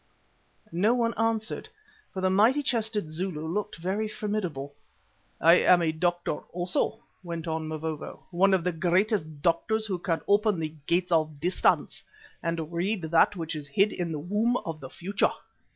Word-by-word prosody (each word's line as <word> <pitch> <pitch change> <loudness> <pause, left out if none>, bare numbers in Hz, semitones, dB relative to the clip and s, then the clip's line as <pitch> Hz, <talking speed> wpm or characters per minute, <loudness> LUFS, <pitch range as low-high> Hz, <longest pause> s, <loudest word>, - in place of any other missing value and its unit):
No 200 +8 +3
one 230 -1 +1
answered, 225 - -1 0.4
for 190 - -5
the 185 - +2
mighty 230 +9 +4
chested 220 - -1
Zulu 160 -2 -3
looked 210 +5 -3
very 190 +6 -1
formidable. 185 -10 -3 0.7
"I 170 +2 +7
am 175 -1 +5
a 160 - +2
doctor 175 -1 -1
also," 180 +5 -1 0.2
went 170 -2 -5
on 160 -1 -2
Mavovo, 155 0 -5
"one 190 +2 +4
of 180 - -1
the 180 - +1
greatest 185 +3 +1
of 155 -2 -13
doctors 215 +6 +1
who 190 -4 -2
can 170 -2 -1
open 205 -1 +3
the 155 -1 -3
'Gates 180 +1 +1
of 155 -3 +1
Distance' 175 +5 +1 0.4
and 165 -1 -3
read 185 +3 0
that 165 +5 +3
which 165 -3 -4
is 150 -2 -6
hid 195 +9 +2
in 175 -2 -3
the 155 - -2
womb 210 +10 +1
of 160 -2 -4
the 130 - -8
Future. 195 +7 0
175 Hz, 170 wpm, -27 LUFS, 160-210 Hz, 0.7 s, I